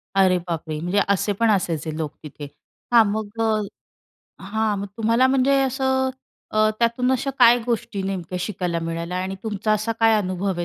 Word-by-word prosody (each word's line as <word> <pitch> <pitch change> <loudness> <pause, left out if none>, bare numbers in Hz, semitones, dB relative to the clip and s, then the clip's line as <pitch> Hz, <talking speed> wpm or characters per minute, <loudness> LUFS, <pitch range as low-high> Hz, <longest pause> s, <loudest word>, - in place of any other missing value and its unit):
अरे 185 -2 +4
बापरे! 160 -2 -4
म्हणजे 180 +5 0
असे 200 +1 +1
पण 230 -1 +3
असायचे 165 -5 -1
लोक 155 -2 -3
तिथे 145 -1 -8 0.5
हां, 230 -2 +8
मग 215 +1 -4
अ 220 -1 +1 0.8
हां, 215 +1 -1
मग 200 - -4
तुम्हाला 230 +3 +3
म्हणजे 270 +1 +3
असं 265 0 0 0.4
अ, 215 0 +3
त्यातून 240 +2 +1
अशा 260 +2 -1
काय 245 0 +7
गोष्टी 235 -4 -2
नेमक्या 185 -2 -4
शिकायला 175 -3 -2
मिळाल्या 165 +2 -4
आणि 190 +1 -4
तुमचा 215 -1 -1
असा 215 +2 0
काय 225 0 +5
अनुभव 190 -1 -1
आहे 175 - -2
210 Hz, 170 wpm, -22 LUFS, 180-230 Hz, 0.8 s, हां